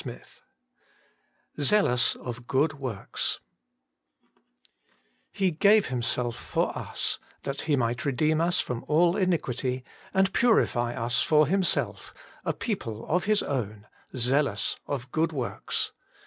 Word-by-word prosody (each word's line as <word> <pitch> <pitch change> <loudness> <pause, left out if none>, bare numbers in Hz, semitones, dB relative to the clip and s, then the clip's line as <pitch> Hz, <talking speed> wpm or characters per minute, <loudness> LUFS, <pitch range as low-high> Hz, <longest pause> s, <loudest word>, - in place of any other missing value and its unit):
XXI - - -10 1.2
Jealous 145 - +3
ot 120 0 -7
Ooo^ 140 +4 +3
Wiovks 130 -9 -2 1.0
' - - -37
He 190 -2 +3
gave 200 +4 +4
Himself 120 -1 -1
for - - -1
us, - - -2 0.2
that 135 0 -3
He 155 -3 +1
might 120 -2 0
redeem 155 +3 +1
us 175 +2 +2
from 120 -2 -2
all 170 +3 +4
iniquity, 130 - 0 0.3
and 190 0 +2
purify 120 - +2
us 115 +1 0
for 155 -1 +4
Himself, 185 +3 0 0.3
a - - 0
people 115 - -4
of 180 +3 +1
His 210 0 +2
own, 105 -6 -3 0.3
zealous 135 +4 +1
of 130 -3 -4
good 165 +1 +1
works.' 130 -6 -2
140 Hz, 120 wpm, -27 LUFS, 120-175 Hz, 1.2 s, gave